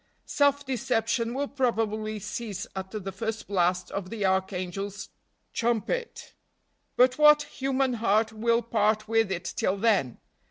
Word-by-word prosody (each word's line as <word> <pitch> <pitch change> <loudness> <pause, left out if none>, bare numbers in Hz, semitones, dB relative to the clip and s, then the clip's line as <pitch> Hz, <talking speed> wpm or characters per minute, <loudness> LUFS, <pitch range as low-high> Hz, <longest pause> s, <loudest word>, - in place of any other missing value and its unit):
Self 285 0 +2
deception 230 -2 -1
will 285 +1 -1
probably 220 -5 -1
cease 205 -1 -5
at 190 0 -5
the 195 -2 -5
first 220 +3 -4
blast 180 -2 0
of 190 -2 -4
the 210 -2 -2
archangel's 190 +1 -2 0.4
trumpet. 240 - -2 0.6
But 255 +2 +4
what 300 0 +7
human 270 -2 -1
heart 220 0 +2
will 230 +2 +1
part 215 -1 +1
with 225 -2 +2
it 175 -1 -3
till 190 - +1
then? 195 - +1
220 Hz, 130 wpm, -27 LUFS, 195-240 Hz, 0.6 s, what